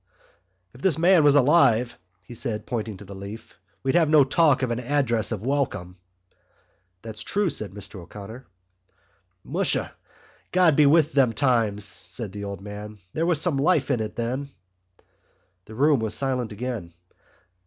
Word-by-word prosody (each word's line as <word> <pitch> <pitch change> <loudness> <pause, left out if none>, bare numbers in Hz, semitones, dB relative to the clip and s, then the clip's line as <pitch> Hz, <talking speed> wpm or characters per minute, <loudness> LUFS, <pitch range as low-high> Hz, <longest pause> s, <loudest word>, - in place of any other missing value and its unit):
"If 125 - -15
this 180 -5 +2
man 170 0 +5
was 145 -1 +5
alive," 125 -5 +4 0.3
he - - -10
said, 110 -3 -4
pointing 110 -4 -4
to 105 - -12
the 100 - -10
leaf, 100 +1 -10 0.2
"we'd 135 - 0
have 165 -3 +3
no 150 -2 +6
talk 140 -1 +3
of 125 - 0
an 120 - -1
address 125 -4 0
of 110 -3 -4
welcome." 125 -10 -2 1.1
"That's 110 -2 -7
true," 200 - 0
said 105 -7 -5
Mr 100 0 -8
O'Connor. 105 +8 -10 1.0
"Musha, - - -1 0.6
God 180 -5 +4
be 150 -1 +5
with 155 +1 +4
them 130 -5 +3
times!" 115 -5 +1
said 90 +3 -3
the 100 0 -6
old 100 -1 -6
man. 105 +1 -8 0.2
"There 165 +2 0
was 170 -4 +2
some 160 -3 0
life 145 -1 +2
in 125 - +1
it 110 -1 -4
then." 130 +4 -3 1.2
The 110 - -11
room 145 +2 +3
was 110 -1 -2
silent 130 -4 -1
again. 105 -6 -5
120 Hz, 160 wpm, -24 LUFS, 105-145 Hz, 1.2 s, no